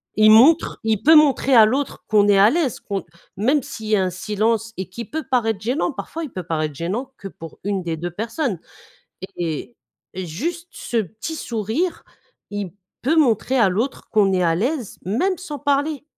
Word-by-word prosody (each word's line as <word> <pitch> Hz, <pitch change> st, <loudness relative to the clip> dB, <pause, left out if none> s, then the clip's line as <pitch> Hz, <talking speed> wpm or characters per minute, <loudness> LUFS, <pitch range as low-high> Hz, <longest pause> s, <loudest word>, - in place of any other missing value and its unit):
Il 215 Hz, 0 st, +6 dB
montre 275 Hz, +10 st, +5 dB
il 220 Hz, -2 st, 0 dB
peut 320 Hz, +3 st, +7 dB
montrer 280 Hz, -3 st, +4 dB
à 225 Hz, -3 st, +9 dB
l'autre, 265 Hz, +5 st, -2 dB
qu'on 210 Hz, -1 st, +4 dB
est 200 Hz, -1 st, +5 dB
à 200 Hz, +2 st, +7 dB
l'aise, 300 Hz, -3 st, 0 dB
qu'on 195 Hz, -4 st, -4 dB, 0.3 s
même 260 Hz, +9 st, +2 dB
s'il 270 Hz, -6 st, -8 dB
y 215 Hz, -, +3 dB
a 195 Hz, -, +2 dB
un 185 Hz, -, 0 dB
silence, 215 Hz, +4 st, -1 dB
et 190 Hz, -1 st, -5 dB
qui 235 Hz, +5 st, -7 dB
peut 315 Hz, +8 st, -4 dB
paraître 225 Hz, -5 st, +1 dB
gênant, 255 Hz, +10 st, 0 dB
parfois, 320 Hz, +4 st, -6 dB
il 295 Hz, -, -7 dB
peut 185 Hz, -, -5 dB
paraître 155 Hz, -2 st, -2 dB
gênant 195 Hz, -, -3 dB
que 195 Hz, -, -8 dB
pour 165 Hz, -4 st, -11 dB
1 195 Hz, -1 st, -2 dB
des 165 Hz, -2 st, -3 dB
2 175 Hz, +2 st, -4 dB
personnes, 225 Hz, -, -3 dB, 0.8 s
et 160 Hz, -8 st, -4 dB, 0.4 s
et 185 Hz, 0 st, -4 dB
juste 330 Hz, -, -4 dB
ce 240 Hz, -, -4 dB
petit 220 Hz, -, -4 dB
sourire, 235 Hz, -, -2 dB, 0.5 s
il 205 Hz, -3 st, -4 dB, 0.3 s
peut 290 Hz, +6 st, +2 dB
montrer 260 Hz, -3 st, +2 dB
à 220 Hz, -6 st, +4 dB
l'autre 225 Hz, +9 st, -3 dB
qu'on 200 Hz, -3 st, +3 dB
est 185 Hz, -, +2 dB
à 165 Hz, -2 st, +2 dB
l'aise, 245 Hz, -, -2 dB
même 345 Hz, -, 0 dB
sans 300 Hz, -6 st, -7 dB
parler 285 Hz, +1 st, 0 dB
220 Hz, 195 wpm, -21 LUFS, 195-280 Hz, 0.8 s, à